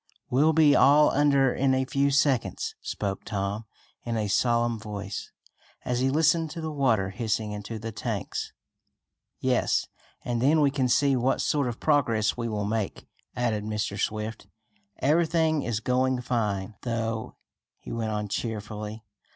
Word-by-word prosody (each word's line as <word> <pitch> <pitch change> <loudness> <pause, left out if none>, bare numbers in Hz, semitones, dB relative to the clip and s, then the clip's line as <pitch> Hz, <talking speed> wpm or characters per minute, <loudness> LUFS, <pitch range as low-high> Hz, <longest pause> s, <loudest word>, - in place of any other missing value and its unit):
"We'll 145 +6 +4
be 155 -2 +5
all 145 +2 +6
under 140 -2 +3
in 135 0 +2
a 130 0 +1
few 140 +2 +1
seconds," 135 -3 +1
spoke 100 -2 -3
Tom 100 +2 -3 0.4
in 115 -1 -2
a 105 -1 -1
solemn 120 +2 +1
voice, 105 -2 -6 0.5
as 125 -1 0
he 130 +1 +2
listened 160 +2 +3
to 165 - -7
the 160 -1 -3
water 115 -10 +1
hissing 110 0 -2
into 105 +2 -6
the 115 +1 -5
tanks. - - -4 0.9
"Yes, - - +1 0.4
and 120 -1 -1
then 150 +5 +4
we 145 -2 +4
can 130 -3 0
see 135 +3 +3
what 130 +1 +1
sort 145 -3 +1
of 120 -1 -4
progress 115 -8 +2
we 115 -1 -3
will 105 -2 -2
make," 110 -1 -2 0.3
added 115 -4 0
Mr. 105 -1 -3
Swift. 110 +1 -3 0.5
"Everything 160 +1 +2
is 120 -5 -2
going 130 0 +1
fine, 110 -5 -1
though," 115 -2 -3 0.4
he - - -10
went 115 -1 -2
on 105 -1 -2
cheerfully. 105 0 -4
120 Hz, 150 wpm, -27 LUFS, 105-140 Hz, 0.9 s, all